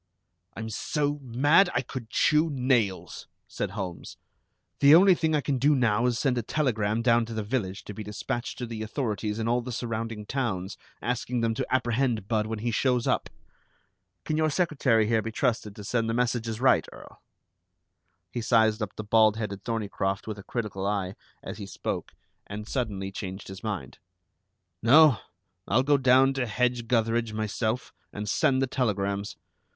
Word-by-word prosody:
"I'm 110 0 -5
so 145 +5 -1
mad 145 +9 +4
I 120 - +3
could 125 -3 -7
chew 155 +5 +3
nails," 125 -8 0 0.2
said - - -3
Holmes. 90 -4 -6 0.6
"The 145 +2 +8
only 190 +2 +7
thing 160 -2 +1
I 150 - +2
can 135 -2 -1
do 145 +3 +4
now 120 -2 +2
is 120 - +1
to - - -2
send 130 -4 +1
a - - 0
telegram 115 -4 0
down 120 -1 +4
to 115 - -6
the 110 - -2
village 105 -4 -3
to 105 - -8
be 110 - -7
dispatched 105 +3 -4
to 125 - -4
the 115 -2 -6
authorities 110 -2 -2
in 115 0 -2
all 120 +1 +2
the 125 +1 -6
surrounding 115 -2 -4
towns, 105 -7 -2 0.3
asking 125 0 -1
them 115 -1 +1
to - - -3
apprehend 120 -4 0
Budd 110 -1 0
when 110 0 -3
he 120 - +1
shows 125 +1 +1
up. - - 0 1.0
Can 155 - -1
your 155 0 +2
secretary 140 - +2
here 110 0 +2
be 115 - -5
trusted 110 -4 -1
to 105 - -9
send 115 +2 -1
the 115 - 0
messages 120 -2 -1
right, 130 +1 +3
Earl?" - - -14 1.1
He 120 - -3
sized 110 -1 +3
up 105 -1 -4
the 110 - -5
bald 110 0 +4
headed 100 -3 -4
Thorneycroft 100 -4 -2
with 110 -2 -5
a - - -10
critical 100 -5 -3
eye, 100 -2 -1 0.3
as - - -7
he 100 - -6
spoke, - - -5 0.3
and 105 +1 -7
suddenly 100 -8 -3
changed 95 -1 -7
his 95 0 -9
mind. 105 -4 -5 0.8
"No. 145 +1 +6 0.5
I'll 125 +5 +3
go 145 +1 +4
down 130 +1 +5
to 130 -2 -1
Hedge 120 +1 0
gutheridge 115 -1 +1
myself 110 +2 -2 0.2
and 105 0 -5
send 130 +6 +2
the - - +3
telegrams. 100 -5 -1
115 Hz, 175 wpm, -27 LUFS, 105-130 Hz, 1.1 s, The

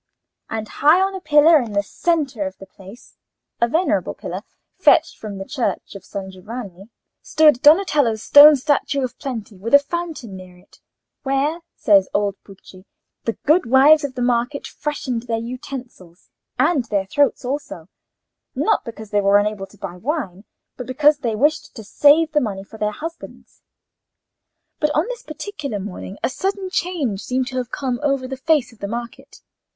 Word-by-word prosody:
And 220 -1 -4
high 305 +9 +3
on 385 +1 +1
a 380 - -6
pillar 305 +1 +5
in 225 -4 -6
the 200 0 +1
centre 275 - -1
of 190 - -9
the 195 - -12
place—a 200 +4 -8
venerable 330 +9 0
pillar, - - -6 0.4
fetched - - +3
from 210 -2 -7
the 195 - -6
church 265 -1 -3
of 195 -2 -10
San 190 -1 -7
Giovanni—stood 225 - -1
Donatello's 295 - +4
stone 295 +1 +9
statue 280 0 0
of 250 0 -4
Plenty, 230 -7 -6
with 230 +7 +3
a - - +12
fountain 290 - -5
near 185 -1 -12
it, 180 - -23 0.4
where, 280 +4 0 0.2
says 200 -3 +3
old 200 -1 0
Pucci, 190 -1 -16 0.4
the 230 - -2
good 310 0 +3
wives 285 +5 +6
of 275 -2 -4
the 250 - -2
market 245 +4 0
freshened 255 -5 -4
their 225 -1 -1
utensils, 240 -7 -9 0.3
and 285 -8 +2
their 200 -3 -1
throats 280 +5 +1
also; 250 - -5 0.7
not 435 - +1
because 220 -4 -10
they 205 -1 +2
were 200 0 +4
unable 205 -1 -1
to 210 - -20
buy 180 -2 -7
wine, 220 - -4 0.3
but 250 - -7
because 290 +3 +3
they 235 -6 -2
wished 295 +6 0
to 225 - -8
save 295 +9 +4
the 300 -1 +2
money 195 -4 -4
for 220 +2 -14
their 210 - 0
husbands. 330 +9 -10 1.2
But 300 - +1
on 310 - +2
this - - -6
particular 300 - -6
morning 195 0 -8
a - - +1
sudden 385 +3 -3
change 300 - -2
seemed 255 +3 -1
to 260 - -6
have 250 -1 -3
come 255 -2 -3
over 275 -3 0
the 265 - -5
face 265 -2 +1
of 225 - -22
the 200 - -4
market. 235 +2 -8
250 Hz, 170 wpm, -20 LUFS, 205-295 Hz, 1.2 s, a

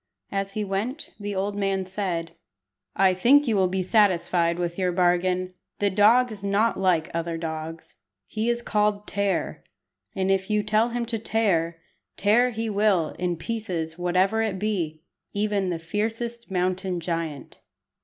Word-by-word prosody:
As 195 0 -2
he 215 - -2
went, 210 +9 -3
the 205 -1 -4
old 200 +2 -1
man 195 -1 0
said 180 -4 -3 0.6
"I 190 -1 +4
think 265 +10 +5
you 225 - +2
will 190 -2 +3
be 185 +1 -1
satisfied 175 -4 +2
with 175 +1 -3
your 180 -1 +1
bargain. 180 +1 +1 0.2
The 205 -1 +1
dog 225 +5 +5
is 205 -2 -9
not 205 +3 +2
like 180 -4 +2
other 165 0 -2
dogs. 160 0 -6 0.3
He 220 +2 -2
is 240 0 0
called 210 -1 +1
Tear, 200 -2 -1 0.5
and 190 0 +1
if 190 +1 0
you 210 0 +2
tell 215 +2 +2
him 240 0 -2
to 230 -1 -3
tear, 180 -7 0 0.4
tear 230 +5 +4
he 225 -1 -3
will 200 -6 +2
in 175 -1 -1
pieces 175 -6 -4
whatever 185 +5 +2
it 215 -4 -1
be, 175 -7 -2 0.3
even 205 -2 0
the 175 - -1
fiercest 225 +7 -3
mountain 185 0 -1
giant." 165 -4 -4
195 Hz, 155 wpm, -25 LUFS, 175-215 Hz, 0.6 s, think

